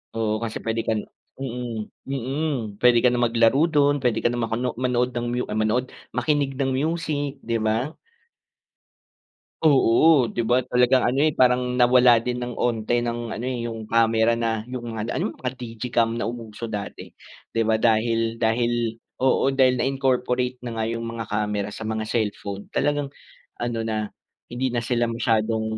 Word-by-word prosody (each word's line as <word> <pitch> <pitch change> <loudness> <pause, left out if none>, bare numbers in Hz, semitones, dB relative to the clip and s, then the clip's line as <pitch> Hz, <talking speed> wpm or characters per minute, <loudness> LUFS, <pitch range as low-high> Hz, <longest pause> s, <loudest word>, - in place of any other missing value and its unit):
Oo, 110 0 -1
kasi 110 -1 -4
pwede 115 0 -2
kan 110 - +1 0.4
mm, 120 -4 -4 0.2
mm. 135 +4 -2 0.3
Pwede 120 -1 +6
ka 125 - +4
na 125 - 0
maglaro 115 +4 +3
do'n, 145 -3 +3
pwede 120 -3 +2
ka - - +1
na 120 0 -1
makuno 115 +3 -2
manood 125 0 0
ng 120 0 -2
mu 125 +1 -1
ay - - -4
manood, 110 +4 +1 0.2
makinig 140 +2 0
ng 135 -1 +1
music, 145 -1 -2
'di 115 - -3
ba? 115 +8 0 1.7
Oo, 145 -1 +5
'di 120 - -2
ba 120 +2 +2
talagang 125 +1 +3
ano 130 +3 +1
eh 155 0 +2
parang 125 0 +3
nawala 125 -1 +6
din 125 +2 -2
ng 120 -1 -5
unti 120 0 0
ng 120 0 -3
ano 115 +2 -4
eh 130 -2 -2
'yung 110 -1 -6
kamera 115 0 +3
na, 115 -2 -1
'yung 125 -1 -6
mga 110 -1 -4
d - - -6
ano, 110 - -3
mga 125 -1 -3
digicam 115 -1 -1
na 110 - -2
umuso 115 -1 -6
dati. 105 -3 -6 0.4
'Di 115 - +1
ba 110 0 +2
dahil 115 +1 +1
dahil 115 0 +1 0.2
oo, 135 +1 +3
dahil 130 -1 +4
na-incorporate 125 -1 0
na 115 -2 -3
nga 110 - -1
'yung 115 0 -3
mga 115 -1 -5
kamera 105 -1 -1
sa 110 +2 -7
mga 110 0 -3
cellphone, 100 -3 -3
talagang 145 -1 0 0.5
ano 120 -1 -2
na, 110 -2 -3 0.4
hindi 130 +2 -1
na 120 -1 -2
sila 120 0 +1
masyadong 115 -1 0
120 Hz, 170 wpm, -24 LUFS, 115-125 Hz, 1.7 s, Pwede